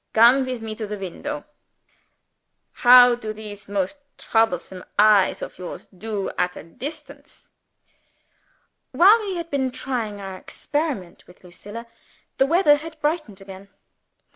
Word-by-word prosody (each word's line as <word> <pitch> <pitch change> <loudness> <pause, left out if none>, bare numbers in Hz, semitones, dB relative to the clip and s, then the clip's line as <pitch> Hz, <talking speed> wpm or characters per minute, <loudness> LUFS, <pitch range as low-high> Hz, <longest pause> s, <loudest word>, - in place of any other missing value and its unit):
Come 245 +4 +5
with 250 -3 -4
me 220 -1 -5
to 220 -2 -4
the 210 0 -5
window. 290 +11 -6 1.3
How 245 0 +7
do 220 -3 -5
these 210 -1 -10
most 200 +5 -2 0.2
troublesome 190 -5 -1
eyes 210 -2 +4
of - - -9
yours 180 - -8
do 210 0 -4
at 180 0 0
a - - -9
distance?" 285 - -10 1.4
While 410 +6 +6
we 395 -3 -4
had 335 -1 -6
been 265 -2 0
trying 245 -5 -4
our 190 -1 -7
experiment 285 - -4
with 180 - -19
Lucilla, 205 +6 -10 0.5
the 270 - +4
weather 325 -2 +4
had 320 +1 -10
brightened 295 - -2
again. 195 0 -12
225 Hz, 135 wpm, -23 LUFS, 200-290 Hz, 1.4 s, How